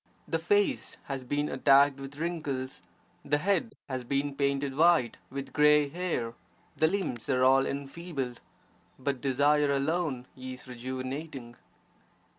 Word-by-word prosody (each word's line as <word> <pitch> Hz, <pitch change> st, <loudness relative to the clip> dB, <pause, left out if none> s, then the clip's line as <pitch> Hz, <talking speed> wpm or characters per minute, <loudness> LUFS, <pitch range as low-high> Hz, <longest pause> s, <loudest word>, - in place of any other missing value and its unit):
The -, -, 0 dB
face 410 Hz, -9 st, +1 dB
has 135 Hz, -2 st, -5 dB
been 145 Hz, +3 st, -1 dB
attacked 140 Hz, 0 st, +4 dB
with 135 Hz, +1 st, -8 dB
wrinkles, 145 Hz, -6 st, -3 dB, 0.4 s
the 145 Hz, -, +2 dB
head 200 Hz, -, 0 dB
has 130 Hz, -2 st, -3 dB
been 140 Hz, +3 st, -1 dB
painted 140 Hz, -1 st, 0 dB
white 160 Hz, -6 st, +4 dB
with 140 Hz, +1 st, -6 dB
grey 150 Hz, -1 st, +5 dB
hair, 160 Hz, -8 st, -2 dB, 0.4 s
the 160 Hz, -, +3 dB
limbs 160 Hz, -, -2 dB
are 130 Hz, -1 st, +3 dB
all 135 Hz, +1 st, +5 dB
enfeebled; 140 Hz, -2 st, -4 dB, 0.6 s
but 135 Hz, -1 st, -2 dB
desire 145 Hz, +2 st, +3 dB
alone 140 Hz, -2 st, 0 dB
is 130 Hz, 0 st, -8 dB
rejuvenating. 130 Hz, +1 st, -6 dB
140 Hz, 125 wpm, -29 LUFS, 130-150 Hz, 0.6 s, grey